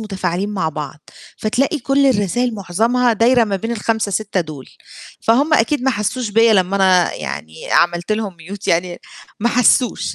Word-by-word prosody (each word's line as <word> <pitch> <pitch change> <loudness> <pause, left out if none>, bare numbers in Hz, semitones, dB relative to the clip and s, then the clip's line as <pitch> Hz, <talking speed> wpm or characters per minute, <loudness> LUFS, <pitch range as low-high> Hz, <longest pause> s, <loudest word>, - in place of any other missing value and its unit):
متفاعلين 190 -2 -3
مع 190 -6 -1
بعض، 150 -1 -8 0.3
فتلاقي 255 +8 0
كل 275 +1 +1
الرسائل 240 0 0
معظمها 225 +6 +1
دايرة 235 +2 +3
ما 200 -2 -2
بين 225 +5 -4
ال5-6 215 -3 -1
دُول، 155 -5 -8 0.5
فهُم 280 +8 +3
أكيد 270 +2 +1
ما 265 - +2
حسوش 240 +2 -2
بيَّ 225 +2 +4
لمّا 190 -1 +2
أنا 185 -3 +3
يعني 75 +3 -7
عملت 175 +3 +2
لهم 215 -2 -2
mute 190 +5 -9
يعني 175 +1 0 0.4
ما 235 - +2
حسوش، 240 - +2
210 Hz, 155 wpm, -18 LUFS, 180-235 Hz, 0.5 s, بيَّ